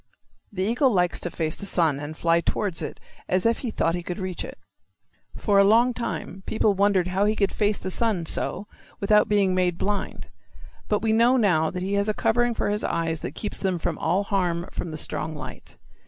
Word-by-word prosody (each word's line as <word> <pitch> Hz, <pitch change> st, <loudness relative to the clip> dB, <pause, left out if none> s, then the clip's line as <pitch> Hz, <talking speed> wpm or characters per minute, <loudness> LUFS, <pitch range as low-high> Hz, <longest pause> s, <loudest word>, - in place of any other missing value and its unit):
The 185 Hz, -2 st, -2 dB
eagle 245 Hz, +6 st, +2 dB
likes 180 Hz, -4 st, +1 dB
to 175 Hz, -, -3 dB
face 160 Hz, -2 st, -2 dB
the 200 Hz, -, -7 dB
sun 160 Hz, -7 st, +1 dB
and 150 Hz, +2 st, -7 dB
fly 170 Hz, 0 st, +2 dB
towards 190 Hz, -1 st, -2 dB
it -, -, -6 dB, 0.3 s
as 185 Hz, +2 st, +1 dB
if 230 Hz, 0 st, +2 dB
he 250 Hz, -, -3 dB
thought 165 Hz, -6 st, 0 dB
he 175 Hz, -, -2 dB
could 175 Hz, 0 st, -5 dB
reach 185 Hz, -2 st, -4 dB
it. -, -, -8 dB, 0.8 s
For 200 Hz, -2 st, +3 dB
a -, -, +7 dB
long 230 Hz, +5 st, +4 dB
time 230 Hz, -5 st, -4 dB
people 215 Hz, -1 st, +2 dB
wondered 195 Hz, -2 st, +2 dB
how 190 Hz, +2 st, +1 dB
he 215 Hz, +1 st, +2 dB
could 200 Hz, -2 st, +1 dB
face 210 Hz, -1 st, +1 dB
the 185 Hz, -, -4 dB
sun 210 Hz, -5 st, 0 dB
so 190 Hz, +4 st, 0 dB, 0.3 s
without 210 Hz, +1 st, +3 dB
being 200 Hz, -3 st, +3 dB
made 180 Hz, -2 st, +1 dB
blind. 205 Hz, +2 st, -3 dB, 0.6 s
But 210 Hz, 0 st, 0 dB
we 220 Hz, -1 st, +2 dB
know 235 Hz, +3 st, +4 dB
now 170 Hz, -9 st, +3 dB
that 180 Hz, 0 st, -4 dB
he 195 Hz, +2 st, -2 dB
has 200 Hz, +1 st, +1 dB
a 210 Hz, -, 0 dB
covering 240 Hz, +1 st, +1 dB
for 205 Hz, -, -1 dB
his 210 Hz, +1 st, -2 dB
eyes 165 Hz, -1 st, -1 dB
that -, -, -6 dB
keeps 210 Hz, -, -5 dB
them 190 Hz, -2 st, 0 dB
from 165 Hz, -1 st, -3 dB
all 180 Hz, +5 st, +1 dB
harm 180 Hz, -4 st, -1 dB
from -, -, -4 dB
the 155 Hz, -, -6 dB
strong 155 Hz, +1 st, -3 dB
light. 145 Hz, -, -9 dB
195 Hz, 215 wpm, -25 LUFS, 175-210 Hz, 0.8 s, a